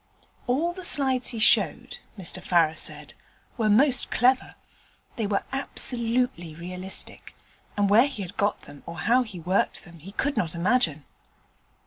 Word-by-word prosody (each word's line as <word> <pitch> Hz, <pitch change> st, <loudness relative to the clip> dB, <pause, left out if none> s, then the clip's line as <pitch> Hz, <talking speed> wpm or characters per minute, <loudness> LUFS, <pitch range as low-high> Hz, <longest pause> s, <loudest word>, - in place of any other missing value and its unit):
All 310 Hz, +8 st, 0 dB
the 370 Hz, +1 st, -9 dB
slides 265 Hz, -6 st, +3 dB
he 235 Hz, -, -4 dB
showed, 215 Hz, -, +2 dB, 0.2 s
Mr 185 Hz, 0 st, -3 dB
Farrer 170 Hz, -3 st, +2 dB
said, 150 Hz, -5 st, -3 dB, 0.4 s
were 220 Hz, -3 st, 0 dB
most 255 Hz, +5 st, +3 dB
clever; 255 Hz, +2 st, +1 dB, 0.6 s
they 220 Hz, -3 st, -2 dB
were 200 Hz, -1 st, -1 dB
absolutely 240 Hz, -, 0 dB
realistic, 180 Hz, +3 st, -4 dB, 0.4 s
and 205 Hz, 0 st, +2 dB
where 225 Hz, +7 st, +5 dB
he 220 Hz, -8 st, -6 dB
had 180 Hz, -, -9 dB
got 205 Hz, +1 st, -1 dB
them 145 Hz, -1 st, -13 dB
or 170 Hz, -, -8 dB
how 245 Hz, +2 st, +3 dB
he 215 Hz, -7 st, -7 dB
worked 180 Hz, +4 st, -1 dB
them 170 Hz, -2 st, -14 dB
he 190 Hz, +6 st, -12 dB
could 285 Hz, +6 st, -1 dB
not 170 Hz, -2 st, -1 dB
imagine. 170 Hz, -, +1 dB
205 Hz, 150 wpm, -25 LUFS, 170-250 Hz, 0.6 s, where